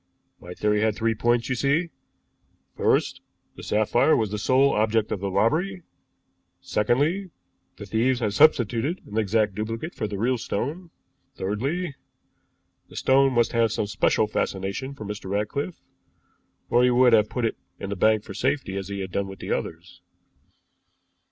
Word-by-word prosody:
My 90 Hz, 0 st, -10 dB
theory 105 Hz, 0 st, +1 dB
had 110 Hz, -1 st, +1 dB
three 115 Hz, +1 st, 0 dB
points, 120 Hz, +1 st, +1 dB
you 130 Hz, -, 0 dB
see. 140 Hz, +7 st, 0 dB, 0.8 s
First, -, -, +1 dB, 0.3 s
the -, -, -10 dB
sapphire 110 Hz, +8 st, +2 dB
was 110 Hz, -3 st, -1 dB
the 105 Hz, -, -3 dB
sole 135 Hz, +5 st, +3 dB
object 110 Hz, 0 st, +1 dB
of 100 Hz, -, -2 dB
the 100 Hz, +1 st, -3 dB
robbery; 160 Hz, -, 0 dB, 0.8 s
secondly, 145 Hz, -, 0 dB, 0.5 s
the -, -, -8 dB
thieves 120 Hz, +3 st, +1 dB
had 105 Hz, -4 st, -1 dB
substituted 140 Hz, -, +3 dB
an 105 Hz, +2 st, -3 dB
exact 105 Hz, 0 st, +1 dB
duplicate 115 Hz, -, -4 dB
for 110 Hz, -, -3 dB
the 100 Hz, -1 st, -5 dB
real 120 Hz, +4 st, 0 dB
stone; 150 Hz, -, -4 dB, 0.5 s
thirdly, 140 Hz, -, -2 dB, 1.0 s
the -, -, -15 dB
stone 135 Hz, 0 st, +3 dB
must 120 Hz, -1 st, +2 dB
have 115 Hz, -2 st, +2 dB
some 105 Hz, -, -1 dB
special 105 Hz, +1 st, +1 dB
fascination 105 Hz, +6 st, -3 dB
for 110 Hz, -, -8 dB
Mr. 100 Hz, -2 st, -6 dB
Ratcliffe, 105 Hz, -, -3 dB, 0.9 s
or 120 Hz, -, +4 dB
he 125 Hz, -, +5 dB
would 125 Hz, 0 st, +5 dB
have 105 Hz, -1 st, +4 dB
put 125 Hz, -2 st, -2 dB
it 115 Hz, -, -2 dB, 0.2 s
in 100 Hz, -, -5 dB
the -, -, -2 dB
bank 110 Hz, +2 st, +3 dB
for 100 Hz, -, -9 dB
safety 130 Hz, -4 st, -1 dB
as 95 Hz, -1 st, -4 dB
he 100 Hz, 0 st, -4 dB
had 95 Hz, -1 st, -6 dB
done 100 Hz, +2 st, -1 dB
with 95 Hz, -1 st, -10 dB
others." -, -, -5 dB
115 Hz, 160 wpm, -25 LUFS, 105-135 Hz, 1.0 s, he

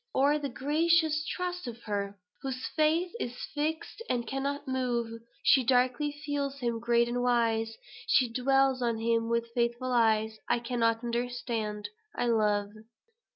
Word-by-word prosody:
or 285 Hz, +3 st, +4 dB
the 285 Hz, -1 st, -3 dB
gracious 305 Hz, +3 st, +2 dB
trust 360 Hz, -4 st, -3 dB
of 235 Hz, 0 st, -7 dB
her: 200 Hz, -1 st, -3 dB, 0.2 s
"Whose 260 Hz, -1 st, -4 dB
faith 325 Hz, +3 st, +2 dB
is 245 Hz, -6 st, -4 dB, 0.2 s
fixt 315 Hz, +8 st, -3 dB
and 240 Hz, -2 st, 0 dB
cannot 275 Hz, +3 st, -3 dB
move; 240 Hz, -3 st, -1 dB, 0.2 s
She 265 Hz, -, +6 dB
darkly 255 Hz, +4 st, +2 dB
feels 280 Hz, -1 st, -2 dB
him 235 Hz, -3 st, -1 dB
great 235 Hz, 0 st, +3 dB
and 245 Hz, +1 st, -1 dB
wise, 225 Hz, -2 st, +1 dB, 0.3 s
She 255 Hz, -, +4 dB
dwells 265 Hz, +2 st, +2 dB
on 235 Hz, -2 st, +1 dB
him 230 Hz, 0 st, +1 dB
with 235 Hz, 0 st, 0 dB
faithful 240 Hz, +1 st, 0 dB
eyes, 220 Hz, -2 st, +2 dB
'I -, -, +4 dB
cannot 230 Hz, -1 st, +1 dB
understand: 235 Hz, -3 st, -2 dB, 0.3 s
I -, -, 0 dB
love.'" 210 Hz, -3 st, +2 dB
245 Hz, 145 wpm, -30 LUFS, 230-275 Hz, 0.3 s, She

